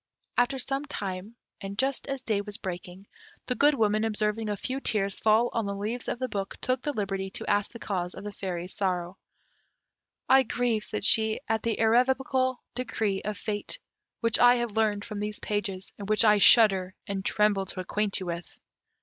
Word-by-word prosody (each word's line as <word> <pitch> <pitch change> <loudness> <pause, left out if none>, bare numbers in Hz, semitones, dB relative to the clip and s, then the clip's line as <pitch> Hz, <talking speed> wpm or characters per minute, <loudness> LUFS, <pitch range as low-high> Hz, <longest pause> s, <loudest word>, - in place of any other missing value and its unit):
After 245 +3 +2
some 270 +2 -2
time, 195 -1 -5 0.3
and 200 0 -6
just 270 +2 0
as 275 -2 -4
day 215 -4 +1
was 205 0 -5
breaking, 180 0 -7 0.4
the 250 - 0
Good 290 +3 +4
Woman 215 -2 +2
observing 215 0 -1
a 205 - -2
few 260 +7 -3
tears 200 -6 +1
fall 220 +2 +3
on 225 -3 -1
the 200 - -3
leaves 220 +5 -2
of - - -2
the 255 +1 -2
book, 200 -4 -4
took 255 0 -1
the 295 - -1
liberty 195 -5 -3
to - - -4
ask 205 0 +1
the - - -9
cause 180 -5 -3
of 190 - -9
the 210 - -5
Fairy's 180 -2 -5
sorrow. 180 -2 -2 1.1
"I 265 +1 +7
grieve," 240 -3 0
said 215 -2 -3
she, 220 -1 +5
"at 225 -1 0
the 230 -1 -1
irrevocable 255 +2 +2
decree 220 -5 -2
of 210 0 -4
Fate, 205 0 -4 0.4
which 230 -2 +3
I 245 0 +7
have 240 -2 -1
learned 210 -2 +1
from 210 -2 -6
these 210 0 -4
pages, 200 -2 -3
and 200 0 -7
which 215 +2 +4
I 210 -1 +5
shudder 195 -4 +5
and 195 -1 -4
tremble 205 -2 +2
to 185 - -6
acquaint 205 +2 -1
you - - -4
with." 170 0 -6
210 Hz, 190 wpm, -27 LUFS, 195-235 Hz, 1.1 s, I